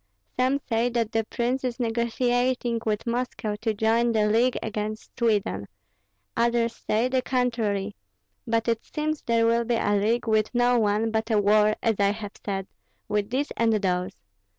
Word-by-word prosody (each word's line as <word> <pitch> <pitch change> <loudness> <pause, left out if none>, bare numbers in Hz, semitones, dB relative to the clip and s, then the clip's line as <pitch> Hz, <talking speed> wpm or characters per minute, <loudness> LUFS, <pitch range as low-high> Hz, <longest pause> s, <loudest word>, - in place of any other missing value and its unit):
Some 255 +2 +2
say 230 0 +1
that 230 -2 -1
the 225 -1 0
prince 245 +4 -1
is 250 0 -3
negotiating 240 +1 0
with 210 -1 -1
Moscow 235 -3 -2
to 225 -1 +1
join 230 +2 +2
the 215 -1 +3
league 230 +4 +2
against 215 0 -5
Sweden; 205 - 0 0.7
others 235 0 +1
say 225 +3 0
the 255 0 +1
contrary; 225 -6 -1 0.5
but 225 0 0
it 230 -1 0
seems 310 0 -3
there 230 -1 +2
will 230 +1 +3
be 235 0 0
a 205 - +1
league 220 +4 +1
with 215 +2 +1
no 245 0 +4
one, 215 +1 +1
but 220 +1 -1
a 215 -2 +3
war, 210 +1 +4
as 225 -3 +1
I 200 0 +3
have 210 -1 -7
said, 195 -2 -3 0.4
with 210 0 -1
these 270 +4 -1
and 230 -1 +2
those. 185 -3 0
225 Hz, 170 wpm, -25 LUFS, 210-240 Hz, 0.7 s, no